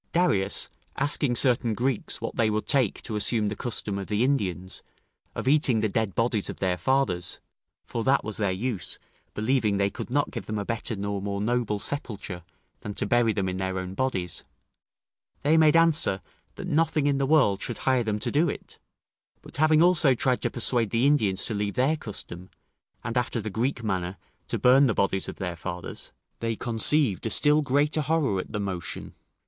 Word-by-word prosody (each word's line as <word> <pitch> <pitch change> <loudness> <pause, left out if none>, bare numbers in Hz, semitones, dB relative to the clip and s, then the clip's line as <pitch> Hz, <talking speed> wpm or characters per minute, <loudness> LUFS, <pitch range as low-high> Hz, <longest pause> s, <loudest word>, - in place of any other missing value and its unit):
Darius 150 - +2 0.3
asking 145 -2 +1
certain 120 -2 +2
Greeks 125 +1 -1
what - - -5
they 115 -2 +2
would 110 0 -1
take 130 -7 +1
to 110 - -4
assume 105 0 +1
the 105 - -4
custom 105 -3 -2
of 95 - -6
the 105 +2 +1
Indians, 95 -9 -1 0.5
of - - -4
eating 135 -5 +3
the 110 - +1
dead 110 -1 -1
bodies 115 -3 0
of - - -6
their 95 -2 0
fathers 125 -6 0 0.5
(for 115 - -3
that 135 +3 +3
was 110 -1 -3
their 100 -3 +1
use, 105 +1 -3 0.4
believing 110 -2 +1
they 100 0 +1
could - - -7
not 145 +3 0
give 115 - -6
them 110 - -3
a 100 - -3
better 115 0 -2
nor 100 0 -3
more 100 0 -3
noble 110 0 0
sepulture 100 - -3 0.4
than 105 -1 -7
to - - -1
bury 120 +1 +3
them 100 -3 -1
in 90 0 -2
their 95 0 -2
own 95 0 -4
bodies), 95 -7 -2 1.0
they 150 +3 +4
made 160 -1 +5
answer, 165 -12 +3 0.3
that - - -7
nothing 155 -1 +1
in 140 -1 +2
the 135 - +1
world 130 -10 +3
should 120 - -4
hire 130 -2 +2
them 105 -2 -1
to - - -2
do 155 +4 +3
it; - - -8 0.6
but - - -9
having 155 +1 +5
also 165 -7 +4
tried 125 +1 +1
to - - +1
persuade 120 -2 0
the 115 +4 +1
Indians 105 -10 +2
to 115 - -3
leave 100 -1 -2
their 135 +5 +2
custom, 95 - -8 0.5
and, 115 0 -3
after 125 -1 0
the 110 -1 -4
Greek 120 +3 -1
manner, 95 -3 -2 0.3
to - - -1
burn 135 +2 +5
the 110 - 0
bodies 95 -1 0
of - - -7
their 90 -3 -4
fathers, 90 +1 -7 0.3
they 115 -1 -1
conceived 120 - +1
a - - -1
still 150 +5 +3
greater 145 +3 +1
horror 145 -9 +1
at - - -6
the 105 - -3
motion. 95 -4 -4
115 Hz, 195 wpm, -26 LUFS, 100-135 Hz, 1.0 s, made